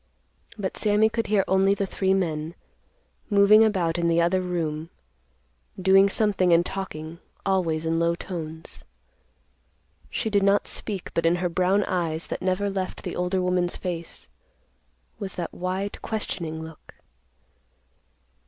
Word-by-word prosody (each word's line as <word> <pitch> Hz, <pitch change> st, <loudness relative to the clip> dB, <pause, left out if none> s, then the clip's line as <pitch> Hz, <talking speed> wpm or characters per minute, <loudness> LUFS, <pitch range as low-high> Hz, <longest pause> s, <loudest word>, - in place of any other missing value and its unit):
But 195 Hz, -3 st, -3 dB
Sammy 210 Hz, +1 st, +3 dB
could 230 Hz, 0 st, -2 dB
hear 205 Hz, -2 st, +3 dB
only 190 Hz, +1 st, +3 dB
the 200 Hz, -, -1 dB
three 190 Hz, 0 st, +1 dB
men, 160 Hz, -3 st, -2 dB, 0.7 s
moving 205 Hz, +1 st, +6 dB
about 180 Hz, -6 st, +1 dB
in 170 Hz, -, +1 dB
the 170 Hz, 0 st, +3 dB
other 175 Hz, +2 st, +2 dB
room, 165 Hz, -3 st, -3 dB, 0.9 s
doing 195 Hz, +1 st, +5 dB
something 195 Hz, -4 st, +2 dB
and 170 Hz, +1 st, +5 dB
talking 170 Hz, -4 st, -6 dB, 0.3 s
always 170 Hz, -5 st, 0 dB
in 165 Hz, 0 st, +1 dB
low 170 Hz, 0 st, +2 dB
tones. 160 Hz, -, -7 dB, 1.3 s
She 220 Hz, -, -2 dB
did 200 Hz, -1 st, +3 dB
not 200 Hz, +1 st, +3 dB
speak, 200 Hz, -5 st, -4 dB
but 165 Hz, 0 st, +1 dB
in 170 Hz, -, +3 dB
her 180 Hz, 0 st, -1 dB
brown 185 Hz, +4 st, +2 dB
eyes, 165 Hz, -3 st, -1 dB
that -, -, -4 dB
never 185 Hz, +2 st, 0 dB
left 195 Hz, -2 st, -4 dB
the 180 Hz, -, -4 dB
older 180 Hz, +1 st, 0 dB
woman's 180 Hz, -1 st, +1 dB
face, 170 Hz, -3 st, -6 dB, 0.9 s
was 195 Hz, -3 st, -4 dB
that 175 Hz, -2 st, -4 dB
wide, 185 Hz, +3 st, -3 dB
questioning 165 Hz, -7 st, -3 dB
look. 160 Hz, -1 st, -13 dB
185 Hz, 140 wpm, -25 LUFS, 170-195 Hz, 1.3 s, moving